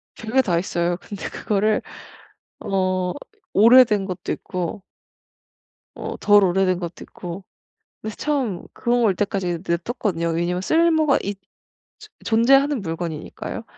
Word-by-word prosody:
별게 240 +4 +1
다 175 -8 0
있어요. 175 -1 -1
근데 200 -2 -7
그거를 215 +1 0 0.8
어 185 -2 0 0.4
오래된 225 -2 +6
것도 185 -1 -4
있고 185 +2 -5 1.2
어 - - -5
덜 205 -1 +5
오래된 185 0 +2
것도 170 -1 -6
있고 180 +1 -8 0.6
그래서 215 0 -6
처음 265 -11 -1
그런 240 0 0
거 - - +4
올 190 -3 +1
때까지 190 -4 -1
냅뒀거든요. 170 -1 -1
왜냐하면 175 +2 -1
쓸모가 320 0 +3
있 200 -1 -4 0.6
존 - - -14 0.2
존재하는 270 +3 +4
물건이니까요. 165 -2 -5
195 Hz, 280 characters per minute, -22 LUFS, 175-230 Hz, 1.2 s, 오래된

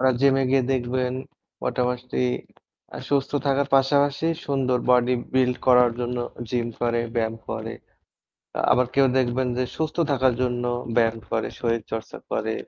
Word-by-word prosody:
ওরা 130 0 +4
জিমে 135 -1 +4
গিয়ে 135 -1 +4
দেখবেন 125 0 -1 0.5
মোটামুটি 125 0 -1 0.8
আ - - -6
সুস্থ 140 -1 +1 0.2
থাকার 140 0 +2
পাশাপাশি 140 +3 +2 0.2
সুন্দর 130 -3 +1
বডি 125 0 +4 0.2
বিল্ড 125 -1 +3
করার 125 -1 +6
জন্য 125 0 -2 0.3
জিম 120 -2 0
করে, 120 -1 +1
ব্যায়াম 115 -1 0
করে। - - -4 1.0
আবার 125 0 +3
কেউ 135 -1 +5
দেখবেন 130 0 +1
যে 130 - +1
সুস্থ 160 -1 -2
থাকার 130 -2 +3
জন্য 125 -1 -1 0.3
ব্যায়াম 115 -1 +3
করে, 110 -1 -1
শরীর 115 -1 0
চর্চা 115 0 -5
করে। 110 +1 -1
125 Hz, 140 wpm, -24 LUFS, 120-135 Hz, 1.0 s, করার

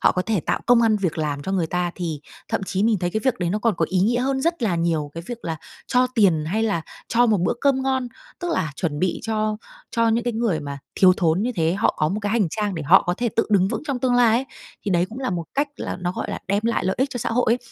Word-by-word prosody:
họ - - +4
có 180 - 0
thể 215 -2 0
tạo - - -1
công 240 -1 +5
ăn 220 -2 +4
việc 180 -6 -2
làm 145 -2 -2
cho 190 - -3
người 180 -4 +1
ta 180 +1 -1
thì 165 -5 -4 0.3
thậm - - -1
chí 190 +1 -1
mình 220 0 +3
thấy 175 0 0
cái 220 - -1
việc 260 - +1
đấy 175 -2 -1
nó 205 - 0
còn 225 -1 +1
có - - +1
ý 185 - 0
nghĩa 235 +6 +2
hơn 265 +1 0
rất 335 -2 0
là 195 -6 +1
nhiều 165 -3 0
cái 165 - -5
việc 240 -1 -7
là 160 -1 -2 0.3
cho 250 0 +3
tiền 185 -9 +3
hay 215 +7 0
là 200 -7 0 0.3
cho 240 +1 +4
một 215 -5 +2
bữa 175 - +2
cơm 275 -2 +2
ngon. 260 -2 0 0.3
Tức 350 -1 -2
là 155 - -1
chuẩn 150 -4 -2
bị 185 +1 0
cho 215 -1 -1 0.3
cho 230 -1 +2
những 230 +1 +1
cái 240 - 0
người 220 -8 0
mà 140 -1 -6 0.2
thiếu 185 -1 +6
thốn 170 +3 +2
như 250 - -1
thế, 165 +1 +2
họ 195 - +1
có 155 - +2
một 205 +5 -2
cái 205 -1 -1
hành 215 -7 +2
trang 205 +1 -2
để 160 - -4
họ 170 +7 +6
có 175 - -1
thể 240 +5 -1
tự 230 - +2
đứng 195 -2 +4
vững - - -3
trong 270 -3 -1
tương 250 0 +1
lai 235 -2 +5
ấy. 260 - -3 0.4
Thì 205 - -1
đấy 175 0 +2
cũng 235 +5 -8
là 260 -6 -2
một 170 -2 -2
cách 285 +1 +1
là - - -4
nó 180 0 -1
gọi - - -4
là - - -3
đem 200 +1 +2
lại 235 0 0
lợi 190 - +1
ích 270 +1 +1
cho 245 - -4
xã - - -2
hội 230 -1 +2
ấy. 240 - +1
205 Hz, 300 wpm, -23 LUFS, 175-235 Hz, 0.4 s, thiếu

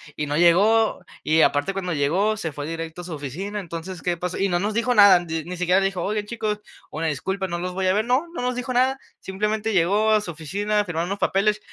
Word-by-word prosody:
y 150 - -3
no 145 +2 -1
llegó 205 +6 +4 0.2
y 155 +1 +3
aparte, 145 +7 +2
cuando 180 -3 -3
llegó, 185 +10 +1
se 160 -6 -4
fue 145 +1 -6
directo 165 +1 -6
a - - -10
su 175 - -6
oficina". 175 +9 -5
Entonces, 170 -1 -7
¿qué 175 -1 0
pasó? 180 +1 -4
Y 195 0 +1
no 175 - +1
nos 205 +3 -2
dijo 240 +2 +1
nada, 200 -4 +8
de 165 -2 -4
ni 180 +2 -7
siquiera 180 +2 +2
dijo: 195 -2 -1
"Oigan, 210 0 -2
chicos, 215 -2 -3 0.3
una 160 +2 -2
disculpa, 190 +6 -2
no 175 - -3
los 180 +1 -4
voy 190 0 -1
a 185 - +3
ver". 215 +2 +1
No, 255 +7 +1
no - - -3
nos 250 0 -1
dijo 250 +1 -4
nada. 260 +2 +2 0.2
Simplemente, 210 +3 -2
llegó 200 +5 +3
a 215 - +4
su 195 - -7
oficina 200 +7 -2
a - - -5
firmar 170 -1 -2
unos 200 +2 -3
papeles 210 +2 +1
190 Hz, 245 wpm, -23 LUFS, 170-210 Hz, 0.3 s, nada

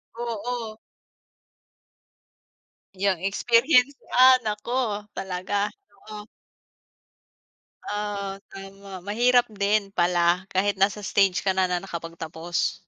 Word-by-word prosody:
Oo. 235 -1 -4 2.2
Yung 190 -3 0
experience 245 +7 +3 0.2
ah, 260 0 +9
naku 215 +3 -3 0.4
talaga, 190 +2 -2 0.4
oo. 210 0 -8 1.6
Oo, 205 -1 -3 0.2
tama 195 -1 -10
mahirap 240 +5 +2
din 205 -1 0
pala 175 0 +2
kahit 200 +2 +1
nasa 195 +2 +1
stage 195 -2 +2
ka 195 - 0
na 190 0 +2
na 180 -1 -1
nakapagtapos. 165 -1 -4
200 Hz, 90 wpm, -25 LUFS, 185-215 Hz, 2.2 s, ah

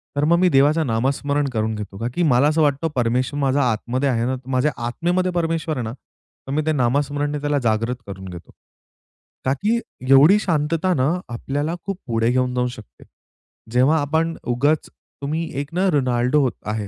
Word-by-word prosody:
तर 145 - 0
मग 170 +2 +4
मी 185 0 +4
देवाचं 150 +3 +3
नामस्मरण 140 +5 0
करून 110 0 -1
घेतो 105 -2 -7
का 115 +3 -2
की 175 - +1
मला 135 -2 +4
असं 155 +1 +2
वाटतं, 145 +2 +1
परमेश्वर 125 +3 0
माझा 140 0 +2
आतमध्ये 125 +5 -1
आहे 115 -2 0
ना 130 +1 0
तर 130 +1 -12
माझ्या 130 +3 +1
आत्म्यामध्ये 175 +8 0
परमेश्वर 165 -3 -1
आहे 125 - -2
ना, 110 0 -4
तर 135 +1 -16
मी 150 +2 +1
ते 155 - +2
नामस्मरणने 145 +2 0
त्याला 145 0 0
जागृत 115 +2 0
करून 95 -1 -8
घेतो. 85 -1 -10 0.9
का 130 - +2
की 215 - 0 0.3
एवढी 150 +10 +7
शांतता 165 0 0
ना, 135 -3 +1 0.2
आपल्याला 145 +7 -2
खूप 195 -1 -4
पुढे 115 -1 +1
घेऊन 125 0 +1
जाऊ 125 0 +1
शकते. 90 - -11 0.7
जेव्हा 130 +6 +3
आपण 160 +3 0
उगाच 140 +6 +1
तुम्ही 155 +4 -6
एक 145 +3 -6
ना 190 +2 +2
रोनाल्डो 130 -1 +2
हो 130 - +2 0.2
आहे 105 -2 -3
140 Hz, 180 wpm, -21 LUFS, 125-155 Hz, 0.9 s, एवढी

